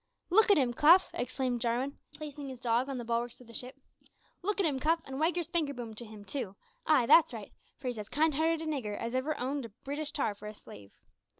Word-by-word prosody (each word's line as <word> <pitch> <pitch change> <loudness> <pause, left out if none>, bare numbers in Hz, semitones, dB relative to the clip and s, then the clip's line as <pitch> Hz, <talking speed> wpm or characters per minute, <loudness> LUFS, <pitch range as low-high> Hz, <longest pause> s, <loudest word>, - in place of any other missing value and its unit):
"Look 435 +4 +6
at 405 - +7
'im, 255 -4 +2
Cuff" 335 +9 +6
exclaimed 250 -1 -2
Jarwin, 245 +4 -1 0.2
placing 290 -2 -7
his 260 -2 -8
dog 245 +2 +1
on 270 - -3
the 240 - -5
bulwarks 235 +1 -2
of 250 - -14
the 230 - -14
ship, 250 +3 -4 0.7
"look 410 +2 -1
at 390 - +3
him, 285 -4 0
Cuff, 325 +5 +2
and 270 0 -6
wag 325 +3 +2
your 350 - +1
`spanker 315 -4 0
boom' 235 -2 -6
to 235 +2 -6
him, 210 -2 -11
too 205 -3 -4 0.3
ay, 290 -6 +5
that's 315 +3 +6
right 215 -3 -7 0.3
for 275 - -15
he's 245 -3 -2
as 210 - -7
kind 310 +1 +2
hearted 320 +2 +1
a - - -5
nigger 255 -10 -2
as 230 +1 -4
ever 265 +4 -1
owned 270 +1 -2
a - - -8
Breetish 285 +8 -4
tar 275 -9 +1
for 205 +1 -10
a 210 - -7
slave." 100 - -14
260 Hz, 240 wpm, -31 LUFS, 235-305 Hz, 0.7 s, at